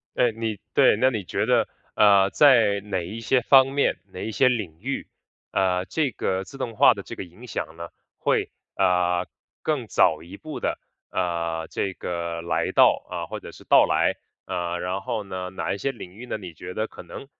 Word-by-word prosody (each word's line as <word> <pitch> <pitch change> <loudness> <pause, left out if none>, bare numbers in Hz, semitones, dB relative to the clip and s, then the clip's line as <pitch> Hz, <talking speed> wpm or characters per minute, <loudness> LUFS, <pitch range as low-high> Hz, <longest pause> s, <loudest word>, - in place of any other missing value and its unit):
呃， 120 - +3
你 110 -2 -3 0.2
对， - - +5
那 130 +4 +4
你 110 -6 -3
觉 105 +5 -1
得， 125 -2 +3 0.3
呃， 100 -2 +6
在 115 -9 +5
哪 95 -3 -3
一 110 +6 -6
些 125 +3 +2
方 135 +2 +5
面、 140 - +1
哪 90 - -7
一 110 - -3
些 130 +5 +3
领 100 -10 -2
域， 135 +4 -4 0.4
呃， 90 -1 +1
这 150 -5 0
个 95 -3 -2
自 135 - -12
动 115 -4 -4
化 - - +7
的 - - -6
这 - - -9
个 - - -5
影 90 +9 -14
响 80 -7 -5
呢， 85 0 -6 0.3
会， - - +1 0.3
呃， 90 -1 +2 0.4
更 145 -7 -1
早 80 -6 +3
一 90 +4 -10
步 155 +5 -7
地， - - -1 0.3
呃， 85 -2 -2
这 95 -2 -2
个 85 -1 -4
来 80 -2 -1
到， - - +5
啊， - - -4
或 - - -6
者 - - -10
是 - - -15
到 - - +6
来？ - - +2 0.3
呃， 85 0 -3
然 95 +2 -2
后 105 +1 -3
呢， 95 -1 -5
哪 95 - -3
一 100 - -3
些 135 +4 -1
领 90 -7 -10
域 120 +5 -10
呢， - - -3
你 90 -5 -9
觉 90 +3 -9
得 110 +1 -1
可 - - -11
能 135 - -10
100 Hz, 220 characters per minute, -24 LUFS, 90-115 Hz, 0.4 s, 化